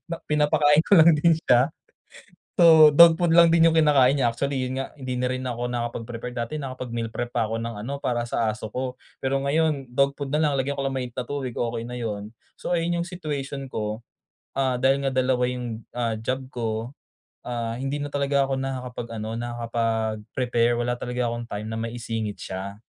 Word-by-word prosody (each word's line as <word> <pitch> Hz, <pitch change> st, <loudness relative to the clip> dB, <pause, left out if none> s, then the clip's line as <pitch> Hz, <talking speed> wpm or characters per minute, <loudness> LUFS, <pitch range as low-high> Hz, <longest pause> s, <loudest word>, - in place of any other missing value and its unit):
Na 170 Hz, -, -4 dB
pinapakain 150 Hz, 0 st, +3 dB
ko -, -, -5 dB
lang 165 Hz, 0 st, +8 dB
din 165 Hz, +3 st, +4 dB
siya. 125 Hz, -5 st, +3 dB, 0.9 s
So 160 Hz, -3 st, +7 dB
dog 165 Hz, +1 st, +8 dB
food 170 Hz, -2 st, +2 dB
lang 170 Hz, -1 st, +7 dB
din 165 Hz, 0 st, +5 dB
yung 165 Hz, -, +4 dB
kinakain 145 Hz, -5 st, +5 dB
niya. 130 Hz, -4 st, +2 dB
Actually 135 Hz, +3 st, -2 dB
'yun 130 Hz, +1 st, -3 dB
nga 135 Hz, -, -5 dB
hindi 130 Hz, -3 st, -4 dB
na 125 Hz, -, 0 dB
rin 130 Hz, 0 st, -2 dB
ako 120 Hz, -1 st, -3 dB
nakapag 120 Hz, -1 st, -3 dB
prepare. 120 Hz, 0 st, -6 dB
Dati 120 Hz, +3 st, -4 dB
nakapag 130 Hz, -4 st, -5 dB
meal 115 Hz, -1 st, -3 dB
prep 120 Hz, +1 st, -5 dB
pa 115 Hz, -2 st, +1 dB
ako 115 Hz, -, -2 dB
ng 115 Hz, 0 st, -4 dB
ano 140 Hz, +5 st, -4 dB
para 120 Hz, -3 st, -1 dB
sa 115 Hz, -, 0 dB
aso 110 Hz, 0 st, -6 dB
ko, 125 Hz, +2 st, -3 dB, 0.2 s
pero 135 Hz, +1 st, -1 dB
ngayon 140 Hz, -2 st, 0 dB
dog 140 Hz, +2 st, +2 dB
food 140 Hz, -2 st, -4 dB
nalang 150 Hz, 0 st, +2 dB
lagyan 140 Hz, +1 st, -2 dB
ko 135 Hz, -, -1 dB
lang 135 Hz, -, -2 dB
ng -, -, -3 dB
mainit 125 Hz, -1 st, -8 dB
na 125 Hz, -, -2 dB
tubig, 135 Hz, -3 st, -4 dB
okey 115 Hz, -1 st, -2 dB
na 125 Hz, 0 st, -6 dB
'yun. 105 Hz, -3 st, -4 dB, 0.2 s
So -, -, -6 dB
ayun 170 Hz, 0 st, 0 dB
yung 170 Hz, -, -6 dB
situation 145 Hz, -6 st, -5 dB
ko. 110 Hz, 0 st, -4 dB, 0.5 s
Ah, 130 Hz, -2 st, 0 dB
dahil 135 Hz, +2 st, +2 dB
nga 135 Hz, -, 0 dB
2 130 Hz, -1 st, +1 dB
yung, 120 Hz, -3 st, -5 dB
ah, 115 Hz, -2 st, -1 dB
job 130 Hz, +4 st, -2 dB
ko, 120 Hz, -2 st, -3 dB, 0.8 s
ah, 115 Hz, -2 st, -3 dB
hindi 135 Hz, +2 st, -2 dB
na -, -, -4 dB
talaga 140 Hz, -1 st, +1 dB
ako 135 Hz, -, 0 dB
nakakapag-ano 125 Hz, -4 st, -5 dB
nakakapag-prepare. 115 Hz, 0 st, -1 dB
Wala 120 Hz, +1 st, 0 dB
talaga 125 Hz, 0 st, -2 dB
akong 120 Hz, 0 st, -5 dB
time 105 Hz, 0 st, -5 dB
na 110 Hz, -, -3 dB
maisingit 115 Hz, -2 st, -4 dB, 0.2 s
siya. 100 Hz, +3 st, -6 dB
125 Hz, 200 wpm, -25 LUFS, 115-140 Hz, 0.9 s, lang